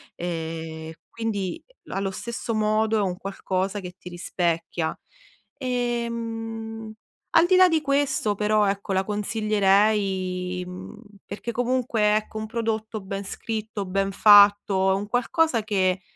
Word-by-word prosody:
e 160 -1 -5
quindi 205 -6 -3 0.3
allo 195 0 -2
stesso 230 +3 -4
modo 215 +1 +2
è 210 - +2
un 185 -2 -1
qualcosa 195 0 -2
che 180 -1 -8
ti 180 - -10
rispecchia. 170 -2 -2 0.6
Ehm, 230 -3 -3 0.4
al 330 +1 +7
di 370 - +4
là 370 0 +8
di 325 -3 +2
questo 275 -7 +1
però 210 0 +2
ecco 195 0 -1
la 190 0 +2
consiglierei, 200 -3 +1
mhmm, 180 +4 -9 0.3
perché 210 +4 -5
comunque 235 -3 +1
ecco 215 0 -5
un 220 - -4
prodotto 220 -1 -3
ben 195 +1 -5
scritto, 220 -1 -4
ben 195 +1 0
fatto 200 -1 +6
è 190 - +3
un 205 +1 -3
qualcosa 245 +2 +1
che, 190 -3 +1
210 Hz, 130 wpm, -25 LUFS, 190-225 Hz, 0.6 s, là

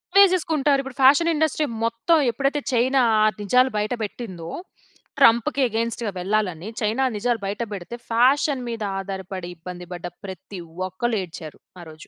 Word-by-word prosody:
వేసేసుకుంటారు. 320 -8 +4
ఇప్పుడు 270 -2 -9
fashion 290 +6 +6
industry 310 0 +1 0.2
మొత్తం 230 +9 +2
ఎప్పుడైతే, 275 +4 0
చైనా 260 +3 +3 0.2
ఆ 215 - +4 0.2
నిజాలు 250 +6 +3
బయట 210 +3 -1
పెట్టిందో, 185 -6 -6 0.7
ట్రంప్‌కి 240 +1 +4
అగైన్స్ట్‌గా 230 -1 -2
వెళ్ళాలని. 190 -2 -1
చైనా 220 +5 +1
నిజాలు 235 +2 0
బయట 205 +4 -3
పెడితే 195 +4 -6 0.2
ఫ్యాషన్ 265 +3 +3
మీద 230 -2 -4 0.2
ఆధారపడి, 190 -2 -6
ఇబ్బంది 180 +1 -8
పడ్డ 175 0 -7 0.2
ప్రతి 190 0 -8 0.3
ఒక్కళ్ళు 225 +5 -2
ఏడ్చారు, 160 -3 -10 0.2
ఆ - - -9
రోజు. 155 +1 -13
230 Hz, 140 wpm, -23 LUFS, 190-270 Hz, 0.7 s, ఫ్యాషన్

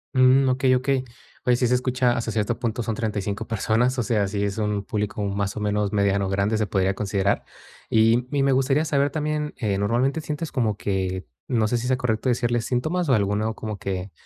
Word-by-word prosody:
Mm, 130 +1 +5
Okey, 130 0 +3
okey. 130 +1 +1 0.4
Pues, 125 -1 +3
sí 125 - +2
se 125 - +2
escucha 125 -1 +1
hasta 115 - -2
cierto 110 +2 -1
punto, 120 0 -2
son 110 - -2
35 105 -1 -3
personas. 115 +3 +1
O 120 - +1
sea, 105 -5 +1
sí 100 +1 -2
es 100 +1 -2
un 105 -1 -1
público, 105 0 -3
más 100 +1 -2
o - - -2
menos, 105 -1 0
mediano, 100 -1 +1
grande, 100 +3 +1
se 110 - 0
podría 95 -1 +1
considerar. 100 0 0 0.5
Y 115 +2 +3
y 140 -1 +1
me 135 - +3
gustaría 135 +3 +2
saber 145 -2 +2
también, 150 0 -2
eh, 100 -4 -1
normalmente 125 +9 +1
sientes 150 +1 -4
como 110 -7 0
que, 95 -2 -2 0.2
no 115 -3 +1
sé 120 - 0
si 120 +2 -3
sea 130 - +2
correcto 125 0 0
decirles 120 -1 +1
síntomas, 155 +6 -1
o - - +5
alguno 105 +2 0
como 110 -2 -5
que, 95 0 -4
115 Hz, 205 wpm, -24 LUFS, 100-130 Hz, 0.5 s, Mm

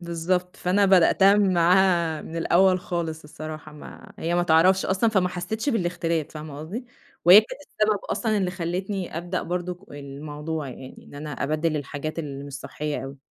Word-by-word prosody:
بالضبط 175 +1 -2
فأنا 195 +3 +2
بدأتها 195 +2 +5
معاها 175 -4 +3
من 165 - -8
الأول 185 +2 +3
خالص 165 -3 -4
الصراحة 155 0 -8
ما 150 - -12
هي 170 +1 -1
ما 175 - +2
تعرفش 180 +3 +4
أصلًا 195 +4 +2
فما 185 -4 +2
حسيتش 185 +8 -4
بالاختلاف 175 - 0
فاهمة 150 -2 -8
قصدي؟ 210 - -6 0.4
وهي 185 +5 +10
كانت 220 - -9
السبب 215 -6 0
أصلًا 220 -3 -1
اللي 185 -2 0
خلّتني 180 +1 -4
أبدأ 175 +1 -3
برضك 180 +1 -3 0.2
الموضوع 145 +1 -6
يعني 130 +1 -11
إن - - -15
أنا 150 +1 -6
أبدّل 155 +3 -1
الحاجات 145 +2 -5
اللي 140 -3 -5
مش 140 - -9
صحية 150 +1 -4
أوي. 135 +1 -8
170 Hz, 160 wpm, -25 LUFS, 155-185 Hz, 0.4 s, وهي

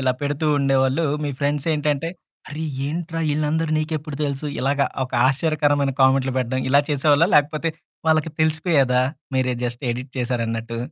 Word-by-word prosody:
ఇలా 130 -1 +2
పెడుతూ 145 +2 -1
ఉండేవాళ్ళు, 135 +2 +2 0.2
మీ 145 - -1
ఫ్రెండ్సేంటంటే, 150 +1 0 0.4
"అరె! 155 +2 -4 0.2
ఏంట్రా 165 +2 -3
ఈళ్ళందరూ 155 +2 0
నీకెప్పుడు 155 -2 -3
తెలుసు?" 140 +1 -3
ఇలాగా 140 +1 +1 0.2
ఒక 130 - -11 0.2
ఆశ్చర్యకరమైన 145 -1 +1
కామెంట్లు 130 0 +3
పెట్టడం, 130 +1 -1
ఇలా 140 +1 +6
చేసేవాళ్ళా? 145 +4 +3
లేకపోతే, 150 +2 +1 0.4
వాళ్ళకి 155 0 +2
తెలిసిపోయేదా? 155 -5 +2 0.3
మీరే 130 -1 +1
జస్ట్ 120 +1 -4
ఎడిట్ 125 +2 -5
చేశారన్నట్టు. 115 -2 -2
145 Hz, 130 wpm, -22 LUFS, 130-155 Hz, 0.4 s, ఇలా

